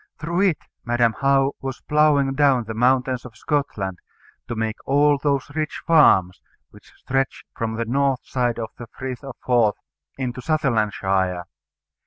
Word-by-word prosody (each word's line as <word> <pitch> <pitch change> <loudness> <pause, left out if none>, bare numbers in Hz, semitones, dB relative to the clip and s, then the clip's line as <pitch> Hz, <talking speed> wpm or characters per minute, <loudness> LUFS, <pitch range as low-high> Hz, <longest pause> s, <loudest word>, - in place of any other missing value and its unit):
Through 170 +4 -1
it 160 - -2 0.3
Madam 120 -1 +2
How 135 0 +3
was 135 -1 -5
ploughing 150 -3 +3
down 135 -3 +3
the 110 0 -6
mountains 125 +2 +1
of 120 -3 -11
Scotland 100 - -2 0.5
to 120 - -4
make 110 0 -2
all 145 +1 +4
those 140 -1 -1
rich 155 0 -3
farms 95 - +4 0.3
which - - -18
stretch 135 0 -2
from 110 -1 -3
the 115 +1 -2
north 135 +2 0
side 125 -2 -1
of 115 -2 -5
the 120 - -8
Frith 130 +3 -7
of 135 -2 -8
Forth 120 -4 +3 0.4
into 130 -1 -4
Sutherlandshire. 105 - 0
130 Hz, 150 wpm, -22 LUFS, 115-140 Hz, 0.5 s, all